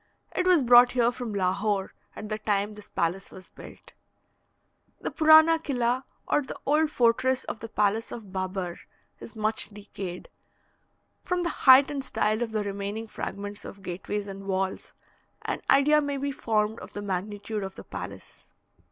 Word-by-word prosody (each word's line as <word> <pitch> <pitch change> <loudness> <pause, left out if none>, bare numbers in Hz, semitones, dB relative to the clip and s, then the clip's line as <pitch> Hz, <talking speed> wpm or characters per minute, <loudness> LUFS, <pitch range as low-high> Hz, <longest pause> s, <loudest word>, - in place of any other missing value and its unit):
It 365 - +1
was 350 -6 +5
brought 245 0 +7
here 240 -1 +3
from 245 -2 -6
Lahore 195 +1 0 0.2
at 215 - -7
the 215 0 -3
time 205 0 0
this 210 -1 -13
palace 175 +3 -2
was 185 - -12
built. - - -14 1.1
The - - -4
Purana 315 +2 +6
Killa, 255 -4 -1 0.2
or - - +2
the 265 - -8
old 305 +2 +3
fortress 255 0 +2
of - - -6
the 225 - -8
palace 210 +1 0
of 210 -5 -9
Babar, 185 -2 -3 0.4
is 225 - -11
much 215 0 -1
decayed. 200 -3 -8 1.0
From 355 0 -1
the 345 - 0
height 265 -2 +6
and 280 -2 -3
style 215 -3 0
of 235 -2 -2
the 215 -1 -1
remaining 200 +2 -4
fragments 205 -1 -6
of 195 0 -10
gateways 200 +3 -4
and 195 0 -8
walls, 190 0 -2 0.5
an - - -3
idea 300 +2 +5
may 285 -1 -2
be 280 +1 -2
formed 220 -3 -1
of - - -11
the 205 - -5
magnitude 205 +2 -3
of 190 0 -6
the - - -10
palace. - - -9
215 Hz, 165 wpm, -27 LUFS, 200-260 Hz, 1.1 s, brought